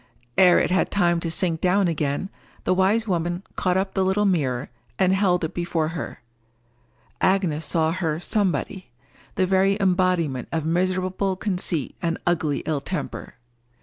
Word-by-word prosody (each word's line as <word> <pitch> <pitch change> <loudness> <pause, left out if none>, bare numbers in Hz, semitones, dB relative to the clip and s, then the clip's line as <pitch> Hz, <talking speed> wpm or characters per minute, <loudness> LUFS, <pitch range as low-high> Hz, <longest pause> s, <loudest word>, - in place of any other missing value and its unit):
Ere 180 +1 +6
it - - +1
had 185 - +2
time 175 -3 +2
to 165 - -3
sink 165 -2 0
down 185 +1 +3
again, 150 +3 -2 0.3
the - - +2
wise 200 +5 +2
woman 175 0 -1
caught 180 0 +1
up 190 +1 -1
the 190 - +1
little 190 +2 +1
mirror, 135 -11 0 0.3
and 190 -1 +3
held 185 -3 +2
it 160 - -3
before 170 -2 -1
her: 165 -6 -6 1.0
Agnes 175 -5 +1
saw 160 -1 +2
her 165 -3 -1
Somebody—the 180 - -2
very 190 +1 +2
embodiment 180 -8 +1
of 160 -2 -2
miserable 185 +3 0
conceit 180 - -2
and 165 0 -1
ugly 160 -5 0
ill 155 -3 -1
temper. - - -5
180 Hz, 150 wpm, -23 LUFS, 160-190 Hz, 1.0 s, Ere